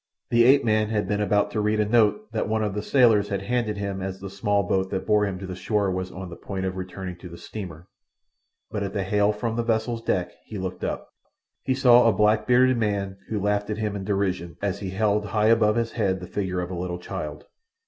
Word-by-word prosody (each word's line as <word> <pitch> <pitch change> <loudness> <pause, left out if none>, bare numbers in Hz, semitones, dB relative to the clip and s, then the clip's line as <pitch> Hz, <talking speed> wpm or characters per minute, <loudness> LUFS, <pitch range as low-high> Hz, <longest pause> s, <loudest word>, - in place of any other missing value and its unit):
The 120 0 +5
ape 140 +3 +6
man 110 -1 +2
had 105 -2 0
been 105 0 0
about 105 0 +2
to 110 - -1
read 105 +1 +1
a 105 - +3
note 120 - +2
that - - -2
one 110 0 +1
of 105 -2 -1
the 105 - -2
sailors 110 -4 +4
had 100 -1 -2
handed 115 -1 -1
him 100 -1 -3
as 95 0 -4
the 100 -1 -7
small 100 +1 +1
boat 95 +1 0
that 95 - -3
bore 105 -1 +3
him 95 -2 -4
to 95 - -7
the 90 -1 -6
shore 100 +2 0
was 95 0 -3
on 95 +1 -7
the - - -7
point 95 +1 -5
of 95 0 -2
returning 95 -1 -6
to 90 - -10
the 85 - -10
steamer, 85 -2 -8 0.8
but 105 - -3
at 100 -1 -3
the 100 - -1
hail 105 +2 +2
from 110 +2 -3
the 120 - +1
vessel's 115 0 0
deck 90 -5 -1
he 110 - -8
looked 95 -1 -5
up. - - -3 0.5
He 130 - 0
saw 125 -2 +6
a - - +2
black 105 +2 +2
bearded 125 0 +4
man 100 -3 -1
who 110 - -1
laughed 105 +1 0
at 105 - -2
him 105 -2 -2
in 100 - -4
derision 95 -4 -2
as 100 -1 -2
he 100 -2 -4
held 105 +2 +1
high 105 +1 +2
above 110 -2 +4
his 115 -1 0
head 95 -5 0
the 90 - -7
figure 95 -2 -2
of 90 +1 -5
a - - -3
little 90 0 -3
child. 90 -5 -6
105 Hz, 245 wpm, -25 LUFS, 95-110 Hz, 0.8 s, ape